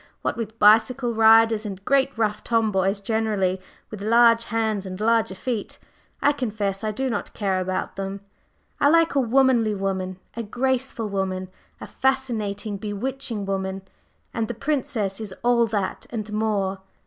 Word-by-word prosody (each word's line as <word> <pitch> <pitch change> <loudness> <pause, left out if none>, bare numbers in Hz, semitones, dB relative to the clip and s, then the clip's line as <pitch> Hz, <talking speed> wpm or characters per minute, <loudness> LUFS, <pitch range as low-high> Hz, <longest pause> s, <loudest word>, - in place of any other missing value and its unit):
What - - -1
with 225 -1 -5
bicycle 235 +4 +4
riders 225 0 +5
and 195 -2 -7
great 275 0 +3
rough 215 -1 0
tomboys 200 -4 +1
generally, 205 -4 0 0.3
with 215 -2 -7
large 230 +1 +5
hands 220 -2 -1
and 185 -1 -7
larger 220 -3 +2
feet, 220 +2 -4 0.5
I 290 - +5
confess 210 -7 -3
I 215 - 0
do 265 +6 -2
not 220 -5 -3
care 195 -3 0
about 185 +1 -3
them. 195 0 -4 0.6
I 285 - +5
like 330 +1 +4
a 280 - +2
womanly 245 -3 +3
woman, 190 -1 -3 0.2
a 235 - -3
graceful 245 +1 -1
woman, 190 -2 -2 0.3
a - - -7
fascinating, 225 -6 -1
bewitching 215 +2 -4
woman, 190 0 -3 0.5
and 225 -1 -1
the 240 - -5
Princess 250 -7 -2
is 200 -4 -6
all 240 -1 +3
that 205 -3 -3
and 215 -3 -5
more. 205 -3 0
220 Hz, 150 wpm, -24 LUFS, 195-235 Hz, 0.6 s, riders